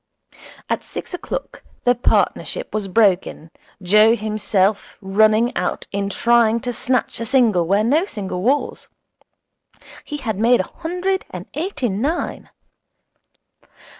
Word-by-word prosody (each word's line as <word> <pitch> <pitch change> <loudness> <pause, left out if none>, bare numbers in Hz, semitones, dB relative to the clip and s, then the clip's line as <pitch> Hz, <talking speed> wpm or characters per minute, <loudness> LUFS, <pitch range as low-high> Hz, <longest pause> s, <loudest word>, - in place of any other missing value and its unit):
At - - -1
six - - -8
o'clock - - -5 0.2
the 245 - +4
partnership 245 - 0
was 215 -2 -2
broken, 185 -5 +1 0.3
Joe 210 +4 +5
running - - -8
himself 210 -2 0 0.6
out - - -2
in 200 0 -2
trying 235 +1 +3
to 245 -1 -3
snatch 250 -1 -1
a 230 - -3
single 220 -10 +3
where 200 +3 +2
no 295 - +2
single 190 - -5
was. 270 +8 -1 1.2
He 295 - -6
had 220 -8 -4
made 235 +2 +4
a - - -9
hundred 360 +3 -2
and - - -8
eighty 305 -5 -2
nine. 270 - -3
230 Hz, 125 wpm, -20 LUFS, 200-270 Hz, 1.2 s, Joe